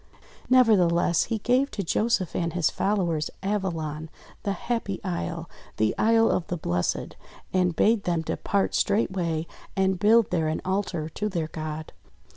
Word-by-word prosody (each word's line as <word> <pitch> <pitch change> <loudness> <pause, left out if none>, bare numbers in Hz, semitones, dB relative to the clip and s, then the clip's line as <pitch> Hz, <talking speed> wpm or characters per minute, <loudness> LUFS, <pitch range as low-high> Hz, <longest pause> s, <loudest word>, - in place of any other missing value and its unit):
Never 255 -3 +6
theless 170 -2 +2
he 230 - -1
gave 250 +6 +2
to 200 - -4
Joseph 210 0 0
and 170 -2 -1
his 170 -4 +1
followers, 180 -6 0
Avalon, 165 -6 -2 0.3
the 200 - -1
happy 200 -1 -3
isle, 85 -1 -3 0.3
the 110 0 +2
Isle 225 +1 +4
of 175 - -1
the 175 - -2
Blessed, 90 - -2 0.4
and 180 -2 +2
bade 220 +2 +3
them 170 -2 +1
depart 200 +4 -1
straightway, 180 -6 0 0.3
and 190 -1 +1
build 220 +2 +4
there 165 -3 +1
an 155 - -1
altar 185 -4 -1
to 210 +6 -3
their 165 -5 -2
God. 155 -1 -6
180 Hz, 150 wpm, -26 LUFS, 160-210 Hz, 0.4 s, Never